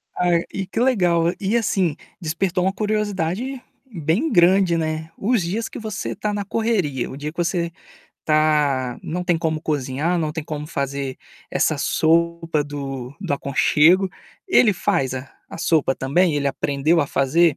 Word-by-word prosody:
Ai, 175 -1 +2
e 195 -1 -3
que 225 - -3
legal. 175 -9 +3
E 205 +4 +1
assim, 190 -8 +1 0.3
despertou 175 +3 -1
uma 190 - +1
curiosidade 210 +3 -2 0.3
bem 170 - 0
grande, 175 0 +4
né, 160 0 -2
os 225 0 +1
dias 210 +7 -2
que - - -8
você 215 -4 -4
tá 210 +1 -2
na 205 -1 -2
correria, 195 - -1
o 135 - -8
dia 150 +1 -4
que 170 - -28
você 170 -1 0 0.5
tá 150 -5 +2
não 180 +3 -3
tem 175 -2 +2
como 160 -1 -1
cozinhar, 150 +3 -1
não 155 -2 -1
tem 160 -2 -5
como 150 -1 -5
fazer 140 -3 -3 0.3
essa - - +1
sopa 165 -1 +1
do 135 -3 -6
do - - -2
aconchego. 155 +7 +3 0.4
Ele 230 - +5
faz 130 -6 0
a 130 +1 -7 0.2
a - - -9
sopa 155 -5 +2
também? 155 +5 +2
Ele 140 -1 +1
aprendeu 145 +4 +1
a 145 - 0
fazer? 150 +4 +2
165 Hz, 160 wpm, -22 LUFS, 145-190 Hz, 0.5 s, Ele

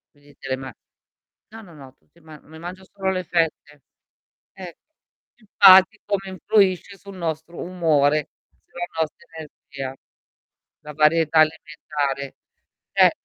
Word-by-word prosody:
Quindi 145 0 -22
te - - -11
le 130 - -1
ma 130 0 -8 0.8
no, 225 0 -11
no, 185 -6 -15
no 135 -3 -14
tutti 170 - -29
ma 155 -1 -14
mi 160 +1 -15
mangio 180 +3 -9
solo 190 0 -3
le 185 -1 -3
fette. 160 -4 -2 0.7
Eh, 180 -3 -10 0.6
infatti 200 -1 +6
come 195 -2 -2
influisce 195 0 +1
sul 195 0 -13
nostro 165 -1 -5
umore, 155 -5 +1 0.4
sulla 175 0 -6
nostra 160 -1 -3
energia, 140 -4 -8 0.9
la 150 - -10
varietà 155 +1 +3
alimentare, 150 -3 -1 0.6
cioè - - +5
160 Hz, 125 wpm, -22 LUFS, 150-185 Hz, 0.9 s, infatti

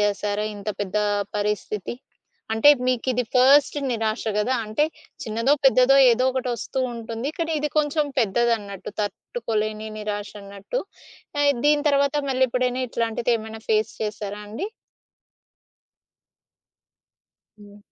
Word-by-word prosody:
చేసారా? 205 0 0
ఇంత 205 +1 -7
పెద్ద 200 0 -3 0.4
పరిస్థితి? 210 0 -2 0.6
అంటే 225 +6 +6 0.2
మీకు 255 -1 0
ఇది 250 0 0
ఫస్ట్ 270 +4 +5
నిరాశ 225 -1 -1 0.2
కదా! 230 +5 +1
అంటే 215 +7 +1 0.4
చిన్నదో, 230 +5 +1
పెద్దదో 265 0 +6
ఏదోకటొస్తూ 255 0 -1 0.2
ఉంటుంది 230 +4 -4
కానీ, 330 -1 -1
ఇది 300 - 0
కొంచెం 300 0 +1
పెద్దదన్నట్టు 220 -3 0
తట్టుకోలేని 215 - -3
నిరాశన్నట్టు. 205 - -5 0.6
ఆహ్, 285 0 +5
దీని 295 0 +3
తర్వాత 280 0 +2 0.2
మళ్ళీ 260 0 +3
ఎప్పుడైనా 250 +1 0
ఇట్లాంటివేమైనా 225 -1 -2
ఫేస్ 215 0 +2
చేసారా 210 -1 -4
అండి? 310 - -4 2.9
హ్మ్. 205 0 -15
230 Hz, 105 wpm, -24 LUFS, 210-260 Hz, 2.9 s, అంటే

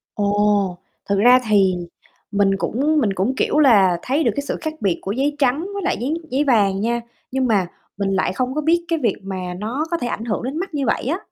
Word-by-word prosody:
Ồ, 205 -2 +1 0.3
thực 200 0 +2
ra 245 +4 +7
thì 195 -3 +4 0.6
mình 200 -1 +2
cũng 290 +10 0
mình 205 -6 +1
cũng, 195 +8 -1
kiểu 300 - +1
là, 200 - +5
thấy 280 +5 0
được - - +2
cái 285 - -2
sự - - -2
khác 315 -1 -3
biệt 190 -4 0
của 195 - -4
giấy 275 +6 0
trắng 270 +1 +2
với 400 -1 -4
lại 375 - 0
giấy 270 +6 -1 0.2
giấy 270 +3 +2
vàng 205 -8 +2
nha, 235 +2 0 0.3
nhưng 260 0 0
mà 200 -6 +2 0.3
mình 200 -1 -1
lại 190 -1 0
không 255 +6 -2
có 305 - 0
biết 340 +3 +1
cái 330 -1 0
việc 225 -7 +1
mà 185 -2 -5
nó 245 +9 -2
có 340 - +1
thể 245 - -3
ảnh 225 -1 -4
hưởng 220 -1 -2
đến 265 +5 -3
mắt 380 -1 -5
như 280 -3 -1
vậy 225 - 0
á. 315 +7 0
235 Hz, 240 wpm, -20 LUFS, 200-285 Hz, 0.6 s, ra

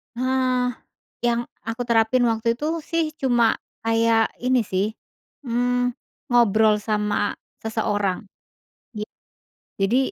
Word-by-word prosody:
Eee, 255 0 +1 0.5
yang 235 0 +2 0.3
aku 230 +2 -3
terapin 235 +2 +3
waktu 230 +1 +1
itu 295 +5 -4 0.2
sih 330 0 +1 0.2
cuma 240 -4 +3 0.3
kayak 225 0 +3
ini 255 -1 +4
sih, 190 -1 0 0.6
eee, 245 +1 +1 0.4
ngobrol 220 -2 +5
sama 210 -1 0 0.3
seseorang, 210 -4 0 0.8
git 210 - -4 0.7
jadi 200 +6 +3
230 Hz, 100 wpm, -23 LUFS, 220-245 Hz, 0.8 s, ngobrol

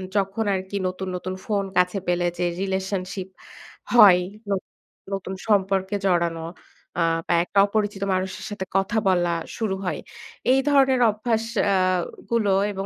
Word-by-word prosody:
যখন 200 +2 0
আরকি 190 +1 -3
নতুন, 185 +1 -4
নতুন 185 +1 -4
ফোন 205 -2 0
কাছে 180 +2 +3
পেলে 175 0 +1
যে 175 - 0 0.2
রিলেশনশিপ 190 -1 -3 0.7
হয়। 200 -7 +8 0.3
ন - - -1 0.6
নতুন 190 -1 -4
সম্পর্কে 195 -1 +1
জড়ানো 170 -3 +1 0.6
আ - - +2 0.3
বা - - +2
একটা 200 - +1
অপরিচিত 205 -1 -1
মানুষের 185 0 -3
সাথে 205 -2 -5
কথা 195 +4 0
বলা 175 -2 +3 0.3
শুরু 215 -4 -1
হয়। - - -2 0.5
এই 265 - +5
ধরনের 265 -3 +4
অভ্যাস 220 +1 -1 0.2
অ্যা 200 -1 +2 0.6
গুলো 215 -4 +2 0.2
এবং 195 -1 -4
195 Hz, 140 wpm, -24 LUFS, 185-205 Hz, 0.7 s, হয়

